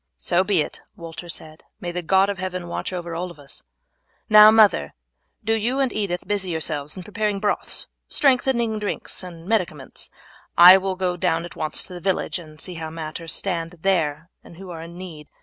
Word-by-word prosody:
"So 180 Hz, +1 st, +2 dB
be 190 Hz, -4 st, +2 dB
it," -, -, -9 dB
Walter 170 Hz, +1 st, -9 dB
said; 155 Hz, -1 st, -5 dB, 0.2 s
"may 175 Hz, -4 st, -4 dB
the 180 Hz, +1 st, -3 dB
God 190 Hz, +3 st, +3 dB
of 195 Hz, -, -7 dB
heaven 185 Hz, -1 st, -4 dB
watch 170 Hz, -, -4 dB
over 175 Hz, -2 st, -5 dB
us 165 Hz, -5 st, -7 dB
all! -, -, -48 dB, 0.6 s
Now, 215 Hz, 0 st, +10 dB
mother, 215 Hz, -, +4 dB, 0.5 s
do 225 Hz, +1 st, +1 dB
you 235 Hz, +4 st, 0 dB
and 265 Hz, -3 st, +1 dB
Edith 195 Hz, -4 st, -2 dB
busy 200 Hz, -3 st, -1 dB
yourselves 155 Hz, -1 st, -2 dB
in 185 Hz, -, -6 dB
preparing 210 Hz, 0 st, -2 dB
broths, 205 Hz, -, 0 dB, 0.2 s
strengthening 250 Hz, -5 st, +2 dB
drinks, 205 Hz, -1 st, -3 dB
and 170 Hz, -3 st, -10 dB
medicaments. 180 Hz, -11 st, -2 dB, 0.5 s
I 180 Hz, +2 st, +11 dB
will 190 Hz, 0 st, -2 dB
go 180 Hz, -1 st, -1 dB
down 170 Hz, -2 st, 0 dB
at 175 Hz, -, -11 dB
once 155 Hz, -, 0 dB
to 185 Hz, -, -9 dB
the 175 Hz, -, -7 dB
village 190 Hz, 0 st, -1 dB
and 155 Hz, -2 st, -13 dB
see 185 Hz, -, -5 dB
how 160 Hz, -2 st, -6 dB
matters 160 Hz, 0 st, -5 dB
stand 170 Hz, -3 st, -2 dB
there 165 Hz, -4 st, 0 dB
and 170 Hz, -, -14 dB
who 190 Hz, -1 st, -9 dB
are 165 Hz, -1 st, -7 dB
in 170 Hz, +1 st, -10 dB
need. 165 Hz, -5 st, -9 dB
180 Hz, 190 wpm, -23 LUFS, 165-195 Hz, 0.6 s, I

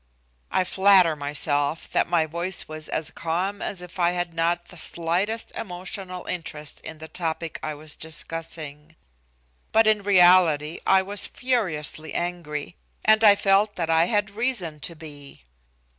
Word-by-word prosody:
I 185 Hz, -, +2 dB
flatter 190 Hz, -3 st, +5 dB
myself 145 Hz, +1 st, -1 dB
that -, -, +1 dB
my 170 Hz, -2 st, +3 dB
voice 170 Hz, +3 st, -2 dB
was 155 Hz, 0 st, -9 dB
as 155 Hz, -, -2 dB
calm 180 Hz, +5 st, -2 dB
as 185 Hz, -3 st, -4 dB
if 180 Hz, +1 st, -11 dB
I 175 Hz, 0 st, +3 dB
had 175 Hz, -1 st, -2 dB
not 170 Hz, +1 st, 0 dB
the -, -, -12 dB
slightest 175 Hz, +8 st, 0 dB
emotional 185 Hz, -1 st, -6 dB
interest 155 Hz, -4 st, -5 dB
in 160 Hz, -, -8 dB
the 160 Hz, +1 st, -9 dB
topic 165 Hz, -1 st, -4 dB
I 155 Hz, -1 st, -4 dB
was 150 Hz, 0 st, -7 dB
discussing. 160 Hz, -1 st, -6 dB, 0.8 s
But 225 Hz, 0 st, +5 dB
in 215 Hz, -1 st, +3 dB
reality 175 Hz, -5 st, +5 dB
I 190 Hz, 0 st, +5 dB
was 200 Hz, +1 st, -1 dB
furiously 160 Hz, -, -2 dB
angry. 150 Hz, -, -4 dB, 0.3 s
And 220 Hz, +1 st, +5 dB
I 205 Hz, -2 st, +8 dB
felt 200 Hz, +1 st, +2 dB
that 165 Hz, -2 st, -1 dB
I 165 Hz, +1 st, +5 dB
had 205 Hz, 0 st, 0 dB
reason 200 Hz, -9 st, -2 dB
to 170 Hz, +3 st, -4 dB
be. 145 Hz, -, -12 dB
170 Hz, 150 wpm, -24 LUFS, 155-190 Hz, 0.8 s, I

